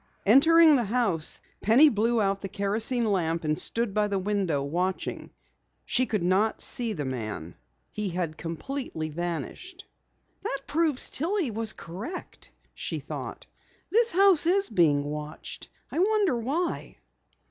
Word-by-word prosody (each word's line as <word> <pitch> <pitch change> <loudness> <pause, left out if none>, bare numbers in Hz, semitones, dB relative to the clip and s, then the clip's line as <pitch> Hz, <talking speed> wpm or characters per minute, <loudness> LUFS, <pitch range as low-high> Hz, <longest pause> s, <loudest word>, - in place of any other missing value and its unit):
Entering 315 +8 +7
the 240 - 0
house, 200 -8 0 0.2
Penny 240 +9 +6
blew 230 -2 +1
out 195 -1 0
the 195 - -5
kerosene 220 +5 0
lamp 170 -6 0
and 155 0 0
stood 230 -3 +1
by 210 0 +1
the 200 -1 -1
window, 190 -7 -1
watching. 180 +6 -3 0.6
She 255 +1 +1
could 210 -5 -1
not 190 +5 +1
see 235 -3 +2
the 150 -7 -4
man. 110 -10 -5 0.4
He 210 -2 -3
had 175 -2 -2
vanished 155 - -17
completely. 165 - -5
"That 175 - -7
proves 305 -3 +1
that - - -2
Tillie 335 - 0
was 220 0 0
correct," 210 - -7 0.2
she - - -4
thought. - - -7 0.5
"This 465 +3 +4
house 375 -3 +4
is 390 -1 +2
being 155 -7 +3
watched. 150 +1 -7 0.2
I - - -2
wonder 405 - +2
why." 280 +10 -3
215 Hz, 140 wpm, -27 LUFS, 170-285 Hz, 0.6 s, Entering